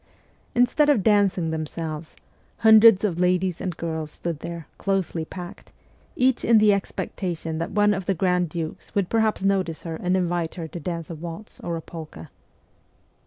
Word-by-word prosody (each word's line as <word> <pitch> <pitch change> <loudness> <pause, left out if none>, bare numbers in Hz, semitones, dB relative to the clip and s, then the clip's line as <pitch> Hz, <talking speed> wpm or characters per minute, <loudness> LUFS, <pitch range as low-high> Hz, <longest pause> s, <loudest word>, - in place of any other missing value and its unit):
Instead 250 +5 +3
of 235 -10 +3
dancing 195 -5 +3
them 155 -1 -3
selves, 155 0 -6 0.4
hundreds 220 -2 +7
of 180 -5 0
ladies 180 -1 +1
and 180 -3 -4
girls 160 -2 -3
stood 165 0 -5
there, 170 -1 -6
closely 190 -4 -1
packed, 175 +2 -9 0.4
each 255 0 +2
in 230 -1 +5
the 210 -1 +5
expectation 175 -4 -3
that 165 +3 -2
one 210 -1 +3
of 190 -2 -4
the 195 - +1
grand 180 -1 +1
dukes 160 +5 -6
would 200 -3 +1
perhaps 220 -3 +1
notice 190 -5 0
her 165 -2 -5
and 180 +2 0
invite 175 -2 -1
her 165 -3 -5
to 170 - -7
dance 170 +1 -5
a - - -5
waltz 170 +6 -8
or 170 -1 -3
a - - -6
polka. 155 - -9
180 Hz, 170 wpm, -24 LUFS, 165-200 Hz, 0.4 s, hundreds